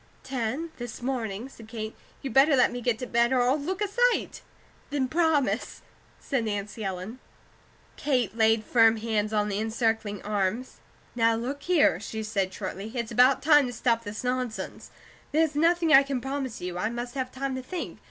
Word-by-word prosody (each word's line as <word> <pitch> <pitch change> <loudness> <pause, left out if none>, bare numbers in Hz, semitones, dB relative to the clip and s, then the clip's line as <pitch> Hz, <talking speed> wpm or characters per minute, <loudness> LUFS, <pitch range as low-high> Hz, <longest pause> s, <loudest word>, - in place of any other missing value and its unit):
"Ten, 265 +5 -3
this 240 -2 -7
morning," 235 -3 -3
said 230 -5 -14
Kate. 220 -1 -6 0.3
"You 270 - -3
better 275 +4 +5
let 250 - +4
me 245 - -5
get 240 -2 +1
to 250 - -5
bed, 235 0 +2
or 255 -2 +3
I'll 255 +3 +3
look 375 +8 -2
a - - 0
sight." 485 +4 +1 0.5
"Then 285 -2 0
promise," 310 -2 0 0.4
said 265 -5 -1
Nancy 210 +1 -4
Ellen. 195 +5 -5 0.8
Kate 250 -8 0
laid 220 -1 +3
firm 225 -2 +5
hands 215 -1 -1
on 210 -1 +1
the 200 -1 -2
encircling 225 -2 -1
arms. 210 +4 -2 0.4
"Now, 230 -1 +3
look 260 +5 -4
here," 320 - +3
she 220 +1 -5
said, 200 -3 -1
shortly, 195 +3 -6
"it's 235 -2 -3
about 250 +3 +4
time 295 -2 +6
to 245 - -5
stop 230 -1 +1
this 210 +1 -6
nonsense. 250 -2 -3 0.4
There's 315 0 +3
nothing 330 +1 +3
I 270 - +10
can 275 -2 -2
promise 270 -1 -4
you. 180 0 -4
I 215 - 0
must 240 +1 -5
have 260 -2 -3
time 270 +1 -3
to 260 - -3
think. 340 +6 -6
240 Hz, 180 wpm, -27 LUFS, 220-275 Hz, 0.8 s, I